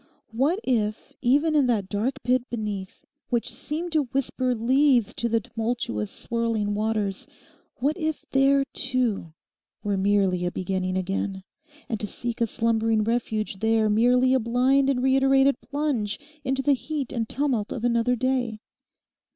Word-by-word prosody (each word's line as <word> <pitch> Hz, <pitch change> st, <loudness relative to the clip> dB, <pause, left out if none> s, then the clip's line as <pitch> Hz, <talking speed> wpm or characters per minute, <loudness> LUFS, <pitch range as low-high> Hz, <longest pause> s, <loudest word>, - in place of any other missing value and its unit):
What 280 Hz, -, +1 dB
if 215 Hz, -4 st, -1 dB
even 290 Hz, +6 st, +3 dB
in 285 Hz, -4 st, +4 dB
that 215 Hz, -6 st, +1 dB
dark 215 Hz, +7 st, -2 dB
pit 250 Hz, +1 st, +1 dB
beneath, 210 Hz, -5 st, -5 dB, 0.2 s
which 235 Hz, -1 st, -1 dB
seemed 335 Hz, +4 st, -4 dB
to 310 Hz, -3 st, +2 dB
whisper 255 Hz, 0 st, -1 dB
Lethe 245 Hz, -1 st, +3 dB
to 235 Hz, -, -1 dB
the 230 Hz, 0 st, +2 dB
tumultuous, 220 Hz, -, -3 dB
swirling 230 Hz, -3 st, -2 dB
waters—what 215 Hz, -, -3 dB
if 315 Hz, -2 st, -2 dB
there, 275 Hz, 0 st, +4 dB
too, 250 Hz, -10 st, -1 dB, 0.5 s
were 205 Hz, -1 st, 0 dB
merely 190 Hz, -2 st, +2 dB
a 175 Hz, -, +1 dB
beginning 185 Hz, +1 st, -2 dB
again, 190 Hz, +1 st, -2 dB, 0.4 s
and 220 Hz, -, -3 dB
to 210 Hz, -, -3 dB
seek 240 Hz, +2 st, -5 dB
a 230 Hz, -, +3 dB
slumbering 225 Hz, -1 st, +1 dB
refuge 220 Hz, -2 st, -1 dB
there 220 Hz, 0 st, +2 dB
merely 250 Hz, +4 st, +4 dB
a 260 Hz, -, +4 dB
blind 255 Hz, +4 st, +2 dB
and 255 Hz, -2 st, +1 dB
reiterated 270 Hz, 0 st, +4 dB
plunge 275 Hz, -9 st, -2 dB, 0.2 s
into 270 Hz, 0 st, -1 dB
the 285 Hz, -, +4 dB
heat 280 Hz, 0 st, -3 dB
and 230 Hz, -3 st, -2 dB
tumult 255 Hz, -6 st, -1 dB
of 235 Hz, -, -4 dB
another 240 Hz, +1 st, +2 dB
day? 245 Hz, -2 st, 0 dB
235 Hz, 145 wpm, -25 LUFS, 210-265 Hz, 0.5 s, in